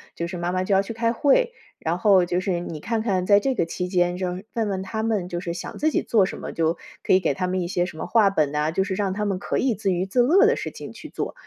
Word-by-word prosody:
就 170 - -3
是 180 +1 -6
妈 175 +1 -2
妈 185 0 0
就 195 +1 +1
要 195 - +5
去 210 +3 -6
开 230 0 0
会， 470 - +3 0.3
然 165 +2 -1
后 190 -1 +4
就 175 +1 0
是 185 -2 -1
你 165 -3 -6
看 225 +6 -2
看 190 -5 0
在 200 +2 +6
这 265 +4 -1
个 170 - +1
期 180 +2 -4
间， 175 -1 +1
就 180 -1 -2
是 190 +3 -9
问 225 -2 0
问 190 -1 -2
他 220 +3 -4
们 205 -6 -1
就 175 - -3
是 170 -1 -4
想 175 - -7
自 310 - +2
己 - - 0
做 210 -5 +3
什 - - -5
么， - - -6
就 165 +1 0 0.2
可 - - +2
以 185 - +6
给 165 -6 0
他 180 +7 -2
们 185 0 -1
一 175 - -2
些 175 -1 0
什 155 - -10
么 - - -4
话 215 -4 +4
本 155 -7 +1
呐， 150 +1 0
就 190 +4 +1
是 190 0 -3
让 195 -1 -1
他 210 +2 -2
们 195 -3 -1
可 - - -2
以 255 -3 +2
自 200 -1 -1
娱 180 +1 -1
自 220 +6 +2
乐 360 - +5
的 470 - +4
事 - - -4
情 - - -9
去 - - -11
做。 - - -4
190 Hz, 335 characters per minute, -24 LUFS, 175-215 Hz, 0.3 s, 在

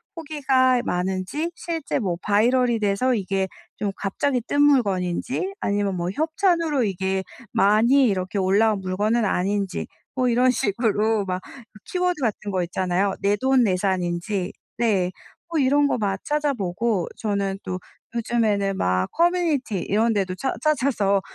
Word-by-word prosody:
후기가 265 -6 +2
많은지 190 - -2
실제 330 -3 -3
뭐 185 -9 -1
바이럴이 235 +3 +2
돼서 210 +5 +1
이게 195 -2 -1 0.3
좀 205 -2 -1
갑자기 250 +6 -1
뜬 285 - +2
물건인지 250 - +1
아니면 200 - 0
뭐 175 +1 -2
협찬으로 320 -3 +1
이게 190 -1 -1 0.3
많이 235 +7 +4
이렇게 185 -1 -1
올라온 200 +2 +2
물건은 210 +5 0
아닌지 195 +1 -1 0.3
뭐 255 -1 +2
이런 250 +2 +4
식으로 220 -2 +1
막 185 -1 -3 0.4
키워드 360 -3 -1
같은 215 -3 -2
거 185 -1 0
있잖아요. 185 +2 0
내 200 +1 +3
돈 265 -1 +4
내산인지. 185 -1 -1 0.2
네. 195 -6 +1 0.4
뭐 330 - 0
이런 285 +2 +3
거 - - 0
막 200 -4 -1
찾아보고 235 - 0
저는 200 -2 -1
또 185 0 -4 0.4
요즘에는 215 -4 +1
막 90 0 +1
커뮤니티 330 - +1
이런 220 +6 +1
데도 190 -3 -1
찾 265 +8 -2
찾아서 250 -10 +2
210 Hz, 290 characters per minute, -23 LUFS, 190-260 Hz, 0.4 s, 많이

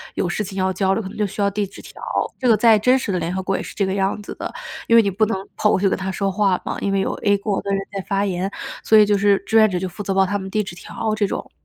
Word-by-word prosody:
有 180 - 0
事 210 +5 -2
情 195 0 -8
要 190 0 +1
交 190 +1 +1
流， 225 - -1
可 - - -6
能 - - -11
就 210 -1 0
需 205 - -10
要 200 - +3
递 205 0 -1
纸 - - -14
条。 - - -13 0.4
这 255 - 0
个 220 -2 +5
在 220 -1 +5
真 255 +5 +4
实 220 -5 -3
的 180 - 0
联 175 - -3
合 190 - -2
国 195 0 0
也 - - -2
是 - - -9
这 200 - +1
个 190 - -1
样 195 +1 0
子 - - -7
的， - - -5 0.4
因 230 - +4
为 230 - +9
你 200 - 0
不 215 +4 0
能 225 - -1 0.2
跑 210 - +2
过 - - +2
去 195 - +2
跟 - - +1
他 190 0 -3
说 195 0 -1
话 195 -2 +1
嘛， - - -3
因 200 - 0
为 195 - +1
有 - - -1
a 205 -1 +3
国 200 0 -2
的 200 - -6
人 195 - +1
在 195 - -3
发 200 0 +1
言， 190 +1 -2 0.3
所 220 - +5
以 210 - +7
就 205 0 +2
是 200 -1 +4
志 225 - +2
愿 215 -1 +6
者 180 - -2
就 185 +1 -2
负 180 +3 -8
责 195 - -3
帮 190 0 +4
他 205 +1 -1
们 190 0 -6
递 210 +1 0
纸 195 -2 -8
条 215 +4 -4
这 210 -2 +1
种。 - - -5
200 Hz, 365 characters per minute, -21 LUFS, 190-210 Hz, 0.4 s, 为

